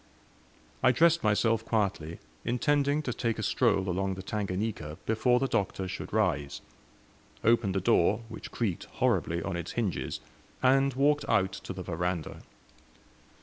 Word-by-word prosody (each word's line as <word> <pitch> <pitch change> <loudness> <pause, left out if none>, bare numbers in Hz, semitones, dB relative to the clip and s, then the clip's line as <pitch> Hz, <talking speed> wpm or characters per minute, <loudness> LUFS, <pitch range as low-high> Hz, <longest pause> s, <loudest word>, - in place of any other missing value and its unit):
I 130 - +5
dressed 170 +6 +4
myself 110 +1 +2
quietly, 100 -8 -1 0.3
intending 140 +5 +1
to 125 - -2
take 115 -1 -1
a - - -3
stroll 95 0 +2
along 95 +1 -1
the 95 - -7
Tanganika 95 -6 -3
before 110 +3 +2
the 135 - +1
Doctor 95 -4 -1
should 95 +1 -6
rise; 85 -10 0 0.8
opened 115 -4 +3
the 95 - +1
door, 105 0 +3
which 110 - -8
creaked 105 -8 -2
horribly 85 0 +1
on 95 - -3
its 85 -1 -5
hinges, 110 -7 -2 0.4
and 135 0 +4
walked 145 +2 +2
out 95 -1 +3
to 100 - -7
the 90 0 -6
veranda. 90 -2 -3
105 Hz, 145 wpm, -29 LUFS, 95-120 Hz, 0.8 s, I